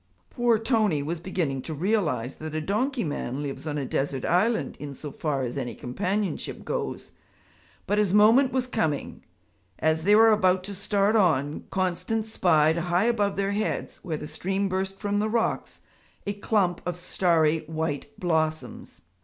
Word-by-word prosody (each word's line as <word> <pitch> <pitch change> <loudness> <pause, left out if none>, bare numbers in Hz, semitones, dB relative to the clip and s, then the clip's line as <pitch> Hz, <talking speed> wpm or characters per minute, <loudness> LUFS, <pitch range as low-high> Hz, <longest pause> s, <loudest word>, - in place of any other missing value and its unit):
Poor 240 -2 +3
Tony 215 - +1
was 165 +3 -3
beginning 165 -7 -2
to 160 +4 -6
realize 150 - 0
that 155 0 -6
a - - 0
donkey 235 - -1
man 145 -3 -3
lives 145 +2 -5
on 150 -1 -2
a 140 - -2
desert 135 0 -2
island 220 +7 +1
in 145 -2 -6
so 150 +2 -7
far 140 -2 -2
as 120 -1 -3
any 120 - -4
companionship 185 +9 -3
goes. - - -4 0.7
But 205 +2 +1
his 205 -3 +2
moment 225 +6 +6
was 260 -1 0
coming. 210 - -2 0.5
As 160 0 +1
they 205 +3 +5
were 225 +1 +7
about 185 -3 +3
to 200 - -4
start 200 +2 +1
on, 155 -8 +2
Constance 190 +4 -1
spied 160 -2 +3
high 175 +4 +1
above 210 -4 +1
their 195 0 0
heads, 210 +1 -2
where 165 -5 -4
the 150 - -7
stream 190 +6 -1
burst 190 +1 -2
from 205 0 -1
the 215 +1 0
rocks, 230 +1 -1 0.4
a 200 - -1
clump 200 -3 0
of 180 0 -3
starry 165 -3 +2
white 160 -2 -4
blossoms. 160 -3 -2
180 Hz, 165 wpm, -26 LUFS, 155-210 Hz, 0.7 s, were